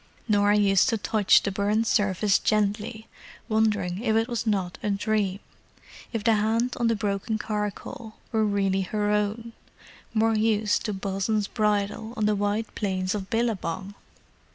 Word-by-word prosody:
Norah 205 -1 +3
used 200 +2 +4
to 230 - +1
touch 210 -1 +3
the 200 - -1
burned 210 +3 +1
surface 205 -1 +2
gently, 215 +1 -1 0.4
wondering 210 -4 0
if 220 -3 +1
it 225 +1 +2
was 235 -2 -3
not 190 -4 -1
a 210 - -1
dream—if 205 +2 -4
the 225 0 +4
hand 225 +3 +1
on 235 - +2
the 230 - +2
broken 205 +1 -2
charcoal 210 +1 -5 0.2
were 220 -2 +2
really 195 -2 +1
her 205 +2 -1
own, 210 +3 -1 0.6
more 225 0 +2
used 215 -1 +1
to 210 - -1
Bosun's 195 +2 -1
bridle 210 +1 -1
on 215 - +1
the 210 - +3
wide 205 +2 -1
plains 185 -3 -1
of 195 -2 -5
Billabong! 205 -5 -2
210 Hz, 150 wpm, -26 LUFS, 200-220 Hz, 0.6 s, used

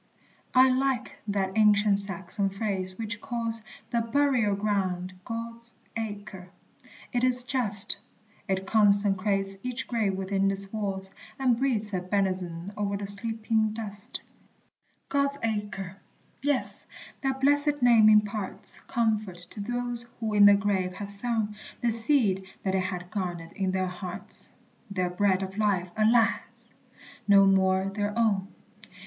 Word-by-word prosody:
I 260 +1 +8
like 260 -1 0
that 195 -2 -1
ancient 210 -2 +4
Saxon 195 0 -2
phrase 190 -2 -3
which 225 -1 -5
calls 230 -1 -2 0.3
The 235 - +2
burial 235 -3 +2
ground 190 -3 -1
God's 230 +1 -6 0.2
Acre! 205 -4 -6 0.6
It 245 0 +1
is 250 -1 +3
just; 210 -6 +1 0.5
It 190 0 -1
consecrates 200 -1 +2
each 250 -1 -3
grave 220 -5 0
within 195 +1 0
its 195 +1 -4
walls, 195 -3 -3 0.2
And 255 -3 +3
breathes 220 -6 0
a 185 - 0
benison 185 -1 -2
o'er 200 -1 -1
the 200 - -5
sleeping 220 +1 0
dust. 205 -2 -5 0.8
God's 280 0 +1
Acre! 205 -4 -3 0.4
Yes, 285 -1 -1 0.3
that 270 -1 -1
blessed 290 0 +3
name 230 -3 +7
imparts 210 -1 +1
Comfort 215 -5 -1
to - - -9
those 240 +2 -3
who 220 -2 -2
in 205 -1 +7
the 205 - +8
grave 195 -2 0
have 200 +2 -2
sown 215 0 +1 0.3
The 240 - +2
seed 225 -5 +2 0.2
that 190 - 0
they 190 - +2
had 180 -1 -4
garnered 175 -4 -4
in 190 -2 -2
their 185 0 0
hearts, 180 0 -2 0.4
Their 185 -3 -1
bread 190 +1 +2
of 190 +2 -6
life, 190 -4 +1
alas! 225 +1 +4 0.9
no 200 -1 +7
more 190 -1 +3
their 205 +2 -2
own. 205 -4 +2
205 Hz, 135 wpm, -27 LUFS, 195-230 Hz, 0.9 s, I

